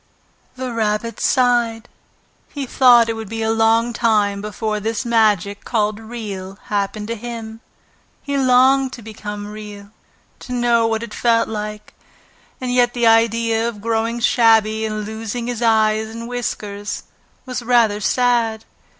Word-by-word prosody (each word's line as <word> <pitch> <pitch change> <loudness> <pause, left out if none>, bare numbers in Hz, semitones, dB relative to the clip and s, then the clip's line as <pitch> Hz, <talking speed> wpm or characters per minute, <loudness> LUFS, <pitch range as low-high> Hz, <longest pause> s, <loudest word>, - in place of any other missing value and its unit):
The 255 -1 -5
Rabbit 220 0 -1
sighed. 240 -3 +1 0.6
He 285 -2 -5
thought 245 -2 +5
it 230 - -1
would 220 -2 -7
be 225 0 -3
a 220 - +1
long 225 +1 +2
time 210 -3 +1
before 215 +1 -3
this 225 +3 -3
magic 210 -4 +1
called 215 -2 -1
Real 205 -4 -7
happened 205 +1 -2
to - - -1
him. 225 -1 -7 0.6
He 280 -1 -3
longed 260 0 +4
to 235 - -9
become 210 -1 -7
Real, 210 -1 -10 0.5
to 250 - -7
know 240 -2 +2
what 225 0 -1
it 235 - -8
felt 230 -1 +2
like; 210 -1 -6 0.7
and 250 -1 -3
yet 245 -1 +2
the 240 -1 +1
idea 230 0 +3
of 220 -3 -9
growing 230 +2 -1
shabby 220 -2 +3
and 215 -1 -4
losing 225 +2 -5
his 240 -1 -4
eyes 220 -1 +2
and 230 +1 -8
whiskers 210 -4 -4 0.4
was 255 -1 -4
rather 230 -3 +2
sad. 230 -1 +1
225 Hz, 145 wpm, -19 LUFS, 215-240 Hz, 0.7 s, thought